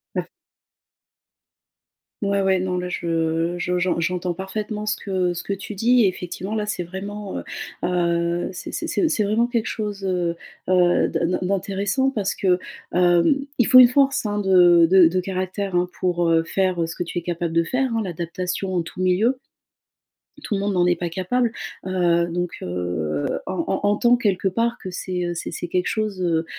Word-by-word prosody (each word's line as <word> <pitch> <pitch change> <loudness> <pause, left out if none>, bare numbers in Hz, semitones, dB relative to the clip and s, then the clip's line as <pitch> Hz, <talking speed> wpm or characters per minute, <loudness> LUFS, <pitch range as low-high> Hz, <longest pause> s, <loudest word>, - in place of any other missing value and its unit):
Bah - - -2 2.0
Ouais, 200 0 +1
ouais, 190 -1 +3
non, 180 0 -1
là, 180 0 -4
je, 165 0 -1
je 180 +1 -1
j'en 175 -1 0
j'entends 180 +1 -1
parfaitement 210 +3 -5
ce 210 - +1
que, 200 - -8
heu, 180 -2 +1
ce 175 - -5
que 200 - -2
tu 200 +2 -7
dis. 240 +4 +4
Effectivement, 185 +2 -4
là, 210 -1 -1
c'est 210 - -3
vraiment, 195 +3 -6
heu, - - -5 0.4
heu, 170 -1 0
c'est - - -7
c'est 340 - 0
c'est 225 -8 +1
vraiment 215 +3 +2
quelque 235 -2 -1
chose, 205 -2 -4
heu, 180 -3 0 0.3
heu, 180 -1 +3
d'in 170 - 0
d'in 180 - 0
d'intéressant 200 +7 0
parce 205 -7 -1
que, 185 -2 +2 0.3
hem, 180 - +3
il 245 - +4
faut 255 - +7
une 250 - +10
force, 275 +1 +2
hein, 210 0 -1
de 175 -4 +6
de 185 -2 +7
de 180 +3 0
caractère, 185 +1 -3
hein, 175 0 +2
pour, 175 -2 +1
heu, 165 0 +4
faire, 185 +1 0
heu, 165 - 0
ce 165 - -7
que 175 - -2
tu 175 0 -4
es - - -9
capable 170 -1 -3
de 170 0 +3
faire, 255 +8 -1
hein, 225 - +1
l'adaptation 180 +2 -3
en 180 - +1
tout 165 +2 -10
milieu. 190 +8 +2 1.1
Tout 210 - -2
le - - -1
monde 200 0 0
n'en 180 -1 +3
est 175 0 +3
pas 175 0 -3
capable, 220 +8 0 0.4
heu, 175 -2 +2
donc, 175 0 -2
heu, 90 -4 -2 0.2
en 185 - -3
en - - 0
entends 240 +4 +4
quelque 200 -5 0
part 230 +5 0
que 185 - -6
c'est, 180 0 -3
heu, 175 - -2
c'est 170 - -5
c'est, 175 - -5
quelque 180 +1 0
chose, 215 -4 -2
heu, 165 -2 +1
185 Hz, 195 wpm, -22 LUFS, 175-205 Hz, 2.0 s, une